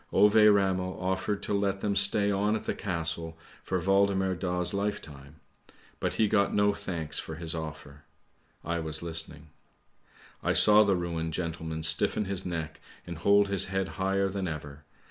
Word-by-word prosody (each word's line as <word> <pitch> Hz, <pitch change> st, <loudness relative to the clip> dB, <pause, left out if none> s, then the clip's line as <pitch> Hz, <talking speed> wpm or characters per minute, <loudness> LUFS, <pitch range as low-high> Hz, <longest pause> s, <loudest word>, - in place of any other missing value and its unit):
Ove 105 Hz, +2 st, +4 dB, 0.2 s
Ramel 95 Hz, -2 st, 0 dB
offered 95 Hz, +2 st, -2 dB
to -, -, -2 dB
let 100 Hz, -1 st, -1 dB
them 100 Hz, -1 st, -1 dB
stay 100 Hz, +1 st, +4 dB
on 105 Hz, +2 st, +1 dB
at 110 Hz, -, -4 dB
the -, -, -2 dB
Castle 80 Hz, -3 st, -4 dB, 0.3 s
for 95 Hz, -, -2 dB
Waldemar 95 Hz, 0 st, +2 dB
Daa's 90 Hz, -1 st, -1 dB
lifetime, 80 Hz, -8 st, -5 dB, 0.6 s
but -, -, -2 dB
he 110 Hz, -, +2 dB
got 100 Hz, -1 st, +1 dB
no 105 Hz, 0 st, +3 dB
thanks 85 Hz, -7 st, -4 dB
for 80 Hz, -, -7 dB
his 80 Hz, 0 st, -5 dB
offer; 75 Hz, -3 st, -8 dB, 0.6 s
I 85 Hz, +1 st, -2 dB
was 80 Hz, 0 st, -4 dB
listening. 80 Hz, -2 st, -3 dB, 0.9 s
I -, -, 0 dB
saw 105 Hz, 0 st, +7 dB
the 100 Hz, -2 st, +2 dB
ruined 85 Hz, -2 st, -3 dB
gentleman 80 Hz, -2 st, -4 dB
stiffen 80 Hz, +6 st, +1 dB
his 95 Hz, -1 st, -3 dB
neck 80 Hz, -2 st, -5 dB, 0.2 s
and 85 Hz, -2 st, -7 dB
hold 100 Hz, +3 st, +4 dB
his 100 Hz, -2 st, 0 dB
head 95 Hz, 0 st, -2 dB
higher 95 Hz, 0 st, 0 dB
than 95 Hz, -1 st, -3 dB
ever. 75 Hz, -2 st, -7 dB
90 Hz, 165 wpm, -28 LUFS, 80-100 Hz, 0.9 s, saw